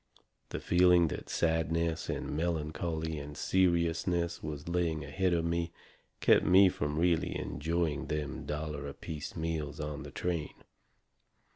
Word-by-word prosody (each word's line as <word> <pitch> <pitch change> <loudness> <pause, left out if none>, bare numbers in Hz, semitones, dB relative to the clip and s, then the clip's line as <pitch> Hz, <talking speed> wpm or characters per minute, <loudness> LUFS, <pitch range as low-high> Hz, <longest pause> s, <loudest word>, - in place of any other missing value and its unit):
The - - -4
feeling 90 -2 +5
that - - -6
sadness 80 0 0
and - - -3
melancholy 80 0 -2
and 75 0 -8
seriousness 85 -1 +1
was 75 -1 -6
laying 85 -3 0
ahead 95 -1 0
of 85 -1 +1
me 85 0 -1 0.5
kept - - +5
me 95 +1 +7
from 75 -3 -2
really 85 +1 +2
enjoying 80 0 -1
them 75 -2 -3
dollar 75 -1 -3
apiece 75 +2 -6
meals 80 -3 -3
on 75 0 -4
the 70 - -7
train. 85 +1 -3
80 Hz, 130 wpm, -31 LUFS, 75-85 Hz, 0.5 s, me